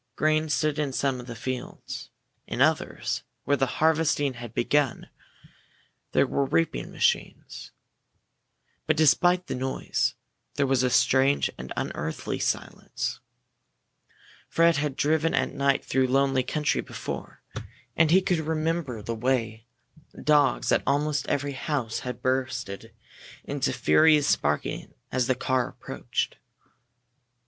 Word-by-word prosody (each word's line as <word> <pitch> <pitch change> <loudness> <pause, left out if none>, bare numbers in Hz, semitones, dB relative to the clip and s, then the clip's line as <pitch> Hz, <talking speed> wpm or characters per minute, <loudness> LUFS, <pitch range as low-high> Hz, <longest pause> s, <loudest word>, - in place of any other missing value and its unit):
Grain 155 0 +1
stood 150 +1 0
in 145 -2 0
some 135 -1 0
of 125 - -9
the 120 - -6
fields. 125 +2 -6 0.4
In - - -4
others, - - +1 0.2
where 145 - +2
the 135 -1 +1
harvesting 155 -3 +2
had 120 -2 -8
begun, 140 +3 0 1.0
there - - +4
were 140 - 0
reaping 85 -8 0
machines. - - -1 1.2
But 155 0 +2
despite 175 +4 +4
the - - -4
noise, 130 +1 -1 0.4
there 140 - +2
was 135 -2 +2
a 130 - +2
strange 135 +3 +3
and 65 +1 -9
unearthly 80 +2 -3
silence. - - -3 1.3
Fred 165 -1 +4
had 145 -2 -1
driven 155 +3 +1
at - - 0
night 140 0 +1
through 130 0 +2
lonely 135 0 +2
country 150 +4 0
before, - - -7 0.5
and 160 -1 +4
he 185 +3 +5
could 180 -3 +1
remember 160 -6 -2
the 115 - -3
way 115 -1 -1 0.5
dogs 145 -4 +3
at - - +4
almost 145 +1 +1
every 145 0 -1
house 135 -5 -2
had 125 -1 -6
burst 130 -4 -1 0.7
into 140 -1 -1
furious 150 +4 +4
barking 75 0 -3 0.2
as 125 -1 +1
the 130 - +2
car 130 -1 0
approached. - - -4
140 Hz, 125 wpm, -26 LUFS, 125-155 Hz, 1.3 s, he